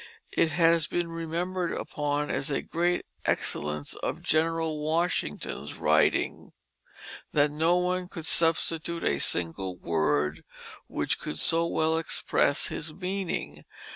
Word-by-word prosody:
It 165 - +2
has 165 0 +3
been 175 -1 -2
remembered 170 +2 -2
upon 145 0 -2
as 135 - 0
a 140 - -1
great 175 +1 0 0.2
excellence 75 0 -1
of - - -4
Gen'l 160 0 +1
Washington's 155 - -2
writings - - +1 0.8
that 145 0 +3
no 160 +4 +2
one 180 0 0
could 165 -3 -7
substitute 165 0 +1
a 70 - +1
single 90 +4 -1
word 75 -2 0 0.4
which - - -1
could 75 - -5
so 165 - +6
well 160 -1 +1
express 145 -3 +1
his 160 0 -4
meaning. 185 +1 -4
160 Hz, 120 wpm, -28 LUFS, 145-170 Hz, 0.8 s, so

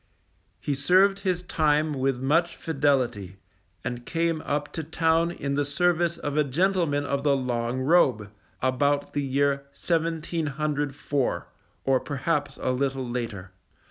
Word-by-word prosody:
He 145 - -2
served 185 +8 +4
his 185 -3 -1
time 155 -2 +1
with 135 -2 0
much 165 +6 +1
fidelity, 130 - 0 0.5
and 120 0 -4
came 165 +2 -1
up 145 0 -2
to 160 - -3
town 165 +1 +2
in 140 -5 -3
the 145 +1 +1
service 170 +3 +1
of 145 0 -4
a 150 - +4
gentleman 155 0 +1
of 140 -1 -1
the 140 -1 +3
long 125 -1 -2
robe, 130 - +3 0.3
about 140 +2 +1
the 145 - 0
year 140 +1 +1
1704, 155 -4 -1 0.4
or 135 -1 +3
perhaps 145 +1 -2
a 130 - 0
little 135 0 -1
later. 115 -6 -4
145 Hz, 135 wpm, -26 LUFS, 135-165 Hz, 0.5 s, served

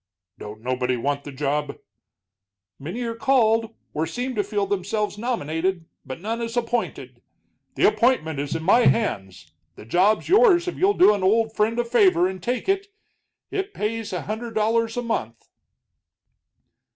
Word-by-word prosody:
"Don't 105 +1 -9
nobody 125 0 -1
want 140 +3 -2
the 145 - -7
job?" 145 +2 -2 1.0
"Many 180 - -5
are 230 -1 -3
called, 225 -2 +2 0.2
or 160 +2 -1
seem 250 +1 -4
to 210 -3 0
feel 205 -1 -1
themselves 205 +2 -2
nominated, 185 - -2 0.2
but 130 +3 -8
none 225 +5 -3
is 230 +1 -4
appointed. 240 0 -3 0.5
The - - +4
appointment 160 - +1
is 140 0 -3
in 160 - -3
my 235 +8 +5
hands; 95 - -1 0.2
the - - -12
job's 185 - +2
yours 385 -3 +5
if 360 - -3
you'll 400 +2 +2
do 345 -11 +6
an 205 - -3
old 220 +3 +2
friend 220 +2 +1
a 240 - 0
favor 195 -7 +4
and 185 -1 -6
take 245 - -2
it. 390 +1 0 0.6
It 395 +1 -3
pays 225 +1 -3
a 180 - -3
hundred 225 +2 -5
dollars 225 +2 +1
a 245 - -1
month." 115 - -4
215 Hz, 160 wpm, -23 LUFS, 160-235 Hz, 1.0 s, do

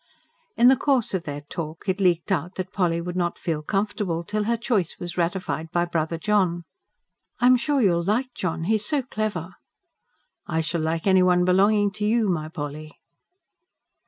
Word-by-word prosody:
In 240 - +6
the 265 - +7
course 260 -5 +1
of 185 -3 -2
their 145 -1 -5
talk 155 +4 -7
it 190 +1 0
leaked 175 0 +2
out 180 0 -1
that 185 -1 -5
Polly 175 -3 +1
would 175 +1 -5
not 175 -1 -1
feel 160 -3 -2
comfortable 195 -1 -2
till 210 +4 -2
her 235 +1 +1
choice 215 - -1
was 175 -1 -6
ratified 170 -2 -2
by 175 +1 +1
brother 165 -1 -2
John. 180 -2 +1 0.8
"I'm 255 +1 +6
sure 275 +4 0
you 195 - +5
will 170 0 0
like 245 +7 0
John; 165 -2 -3
he 215 - +1
is 215 -1 +1
so 275 +5 0
clever." 210 -7 -3 0.9
"I 160 -1 0
shall 160 +1 -2
like 160 +1 -2
everyone 180 -2 +4
belonging 200 +3 +3
to 210 +1 -3
you, 225 -1 +2
my 155 -3 -1
Polly!" 155 -1 -7
180 Hz, 180 wpm, -24 LUFS, 165-210 Hz, 0.9 s, the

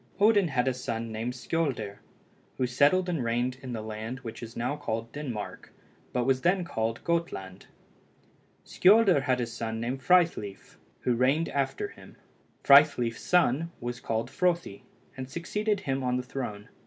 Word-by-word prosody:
Odin 205 -2 +5
had 130 -3 0
a 130 - +2
son 115 -3 -4
named 115 +3 -3
Skioldr 125 -8 -2 0.6
who 130 - +1
settled 145 +9 +3
and 165 -7 -1
reigned 120 +2 -1
in 130 -2 -7
the 110 -2 -4
land 110 +4 -6
which 115 -2 -8
is 115 0 -8
now 125 +5 -1
called 115 -5 -4
Denmark, 125 -8 -6 0.4
but 125 - 0
was 130 +1 +2
then 180 +3 +2
called 115 -5 -2
Gotland. 165 - -3 1.0
Skioldr 195 -5 +5
had 130 -2 +1
a 120 - 0
son 115 -1 -4
named 125 +4 -3
Frithleif, 165 - +1 0.2
who 125 - +1
reigned 135 +7 +2
after 140 - -1
him. - - -15 0.5
Frithleif's 140 -5 +5
son 165 -2 +2
was 120 0 -4
called 115 +2 -2
Frothi, 170 - 0 0.3
and 130 -1 -6
succeeded 210 +6 -2
him 135 -6 -2
on 125 -1 0
the 125 - -2
throne. 115 -6 -6
130 Hz, 155 wpm, -28 LUFS, 115-165 Hz, 1.0 s, Odin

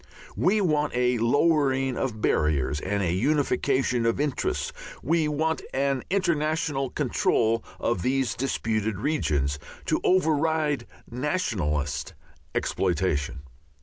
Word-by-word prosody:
We 210 +3 +2
want 150 -5 +1
a 125 -1 +2
lowering 135 0 +2
of 115 -5 -3
barriers 75 -2 +1
and 100 +4 -1
a 85 -2 +1
unification 130 0 +1
of 115 - +1
interests, 145 -3 -1 0.3
we 160 +2 +2
want 160 +2 0
an 135 -1 +1
international 155 -6 0
control 115 -5 +1 0.2
of 115 -6 0
these 130 0 +1
disputed 110 -4 -1
regions, 75 - 0 0.3
to - - 0
override 160 -4 +2 0.2
nationalist 110 - -2 0.4
exploitation. 75 -4 0
135 Hz, 105 wpm, -26 LUFS, 110-150 Hz, 0.4 s, We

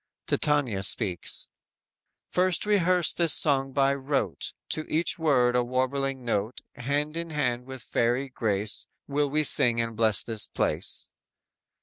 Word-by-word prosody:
"_ - - -65
Titania 140 -10 +1
speaks: 95 -2 +1 0.8
_"First 180 0 +1
rehearse 185 -4 +2
this 170 -2 +3
song 135 -2 +2
by 135 0 +2
rote; 135 - -3 0.2
To 155 - -2
each 170 +3 0
word 125 -6 +2
a 125 - +2
warbling 130 +1 -2
note, 110 +1 -2
Hand 145 +4 -2
in 170 0 -4
hand 125 -5 -2
with 130 -2 -8
fairy 120 +4 0
grace 105 -4 -3 0.2
Will 145 0 0
we 155 +2 +1
sing 120 -4 +4
and 115 -1 -2
bless 110 -2 +3
this 110 -3 +2
place." - - -2
135 Hz, 140 wpm, -26 LUFS, 120-150 Hz, 0.8 s, sing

